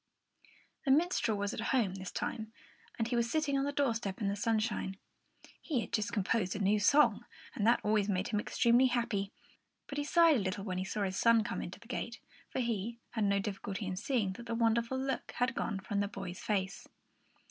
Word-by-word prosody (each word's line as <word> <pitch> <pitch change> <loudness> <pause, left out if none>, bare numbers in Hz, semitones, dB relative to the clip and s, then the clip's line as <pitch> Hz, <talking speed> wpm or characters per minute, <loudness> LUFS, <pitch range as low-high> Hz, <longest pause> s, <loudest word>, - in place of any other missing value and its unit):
The 275 - -2
minstrel 275 - +3
was 205 0 -2
at - - -5
home, 225 -4 +1
this 190 -1 -6
time, 220 -1 -4 0.5
and 225 - 0
he 240 - -1
was 235 0 +1
sitting 310 -1 +1
on 275 0 +1
the 285 - -1
doorstep 230 -8 -1
in 205 -3 0
the 200 - -1
sunshine. 215 -2 -1 0.6
He 275 -8 -1
had - - -8
just 215 -2 0
composed 205 -3 0
a - - -3
new 205 +1 +3
song, 235 +1 +4 0.3
and 210 - 0
that 235 - +4
always 210 -1 +2
made 190 0 0
him 210 - +1
extremely 240 +4 +4
happy; 235 -5 -1 0.5
but 285 - -5
he - - 0
sighed 330 0 +5
a - - +1
little 195 0 -2
when 185 -3 -3
he 185 - -2
saw 205 +2 -2
his 190 -1 -2
son 230 -1 +5
come - - -3
in - - -5
at - - -18
the - - -17
gate, - - -4 0.3
for - - -2
he, 230 -2 -1
too, 235 - -25
had 220 -3 0
no 200 0 +3
difficulty 200 +1 -3
in 185 -1 -3
seeing 220 -2 0
that 235 +5 -10
the 230 - -2
wonderful 230 +2 +2
look 265 0 -3
had 250 +1 0
gone 220 -7 -2
from 200 +1 -2
the 200 - +1
boy's 195 -3 -6
face. 195 -2 -2
220 Hz, 220 wpm, -33 LUFS, 200-240 Hz, 0.6 s, sighed